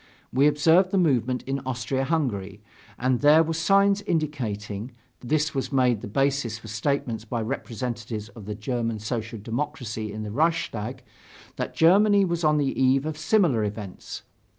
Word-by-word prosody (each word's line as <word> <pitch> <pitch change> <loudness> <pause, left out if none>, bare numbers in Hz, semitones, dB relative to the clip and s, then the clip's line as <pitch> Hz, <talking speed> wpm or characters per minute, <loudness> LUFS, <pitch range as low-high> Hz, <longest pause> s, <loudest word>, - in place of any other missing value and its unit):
We 135 +3 +5
observed 160 +5 +4
the 195 - 0
movement 130 - +1
in 135 +1 -2
Austria 130 0 -2
Hungary, 105 - -2 0.3
and 125 0 +1
there 150 +3 +6
were 165 +1 -2
signs 195 +4 +3
indicating 120 - -3 0.3
(this 150 +4 0
was 135 0 -2
made 125 -5 +2
the - - -6
basis 135 0 0
for 110 - -12
statements 115 +1 -2
by 115 0 -3
representatives 115 -3 -4
of 110 -4 -12
the 105 - -4
German 115 +1 -2
Social 110 +1 -4
Democracy 110 -1 -4
in 110 +1 -5
the 105 - -5
Reichstag) 130 -5 -1 0.5
that - - -4
Germany 200 +4 +5
was 170 -1 -2
on 150 -1 +4
the 140 -2 0
eve 130 +2 +3
of 155 -1 -3
similar 155 - +2
events. 105 -2 -6
130 Hz, 155 wpm, -25 LUFS, 110-155 Hz, 0.5 s, there